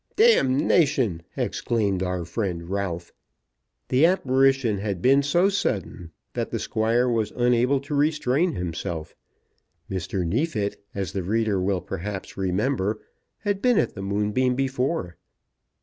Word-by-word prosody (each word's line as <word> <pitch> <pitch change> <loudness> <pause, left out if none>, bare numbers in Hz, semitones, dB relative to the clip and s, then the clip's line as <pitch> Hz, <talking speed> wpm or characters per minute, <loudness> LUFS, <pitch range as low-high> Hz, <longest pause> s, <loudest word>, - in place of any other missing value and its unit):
"D 175 - +4
tion!" 120 - -1 0.2
exclaimed 100 -5 0
our 90 -2 -2
friend 85 -3 -3
Ralph. 90 -4 -3 0.8
The 135 +6 +5
apparition 135 - +2
had 100 -3 -3
been 135 +7 +4
so 170 +7 +3
sudden 100 - -2 0.2
that - - -2
the - - -2
Squire 115 +3 +1
was 115 -3 0
unable 125 +2 +3
to 140 +2 -6
restrain 150 +2 +2
himself. 85 -2 -4 0.8
Mr. 95 0 -2
Neefit, 105 - -1
as 95 -4 -3
the 95 - -1
reader 105 +1 0
will 95 -1 0
perhaps 95 +2 -6
remember, 105 +3 0 0.4
had 205 -2 -1
been 250 -3 +3
at - - +1
the 100 - -7
Moonbeam 105 +6 0
before. 130 - -1
110 Hz, 130 wpm, -25 LUFS, 95-135 Hz, 0.8 s, The